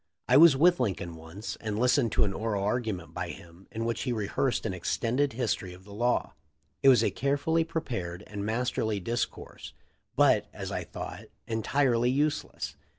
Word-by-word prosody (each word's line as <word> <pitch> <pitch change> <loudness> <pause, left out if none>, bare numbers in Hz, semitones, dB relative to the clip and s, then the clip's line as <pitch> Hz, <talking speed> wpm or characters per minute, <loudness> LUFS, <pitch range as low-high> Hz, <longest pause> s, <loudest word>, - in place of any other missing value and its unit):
I 125 - +4
was 150 -1 +8
with 175 +4 +5
Lincoln 95 -8 -2
once 80 +7 -7
and 110 -2 -4
listened 125 0 +3
to - - +3
an 100 -2 0
oral 105 -2 -2
argument 105 -5 -2
by - - -4
him 85 +3 -12
in 115 +1 -3
which 115 0 -1
he 125 - -1
rehearsed 115 +3 -1
an - - -1
extended 120 +9 0
history 110 -6 -2
of 90 - -16
the 100 +1 -12
law. 120 +4 0 0.5
It 135 - +7
was 120 -4 +6
a - - +2
carefully 145 +4 +1
prepared 105 - -4
and 105 -1 -6
mas 115 +4 0
terly 110 -2 -1
discourse, 115 +5 -4 0.4
but, - - +4
as - - -6
I - - -3
thought, - - -7 0.2
entirely 120 +1 +1
useless. 145 +3 -1
115 Hz, 175 wpm, -29 LUFS, 100-130 Hz, 0.5 s, was